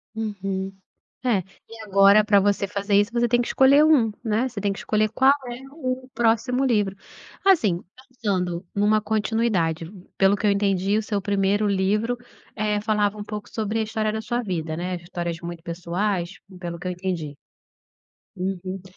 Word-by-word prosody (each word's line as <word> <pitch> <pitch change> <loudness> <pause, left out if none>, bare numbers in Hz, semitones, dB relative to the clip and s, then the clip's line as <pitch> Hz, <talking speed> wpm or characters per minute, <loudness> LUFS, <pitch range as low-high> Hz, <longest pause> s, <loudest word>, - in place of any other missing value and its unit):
Uhum. 195 -3 -3 0.5
É, 235 -6 +3 0.3
e 225 0 -11
agora 200 +1 +6
para 205 -2 +5
você 200 0 +1
fazer 200 +1 -2
isso 205 +2 +3
você 240 0 +2
tem 240 +1 +3
que 240 - -1
escolher 280 +3 +5
1, 270 -8 +4
né. 225 +4 +1
Você 225 -5 -6
tem 200 0 0
que 195 - -8
escolher 215 0 +1
qual 265 +4 +5
é 240 +1 -6
o 260 -4 -4
próximo 235 +3 +2
livro. 210 -6 +1 0.5
Assim, 215 - +4 0.3
pensando 190 -8 -2
numa 210 +1 +3
continuidade, 210 -6 0 0.3
pelo 195 +1 +4
que 210 - -1
eu - - +5
entendi, 200 0 +1
o - - -1
seu 205 -2 -2
primeiro 200 +1 +1
livro, 210 +5 +1 0.4
eh, 210 -1 0
falava 210 -1 +1
um 205 - -5
pouco 210 0 -6
sobre 220 0 -2
a - - +1
história 215 0 -1
da 220 - -2
sua 240 +2 -2
vida, 160 -6 -3
né, 180 +1 -3
histórias 175 -1 -4
muito 170 -1 -7
pessoais, 175 +2 -2 0.2
pelo 170 -1 -5
que 180 - -5
eu - - -1
entendi. 175 -5 -4 1.0
Uhum. 185 0 -4
205 Hz, 170 wpm, -24 LUFS, 190-225 Hz, 1.0 s, agora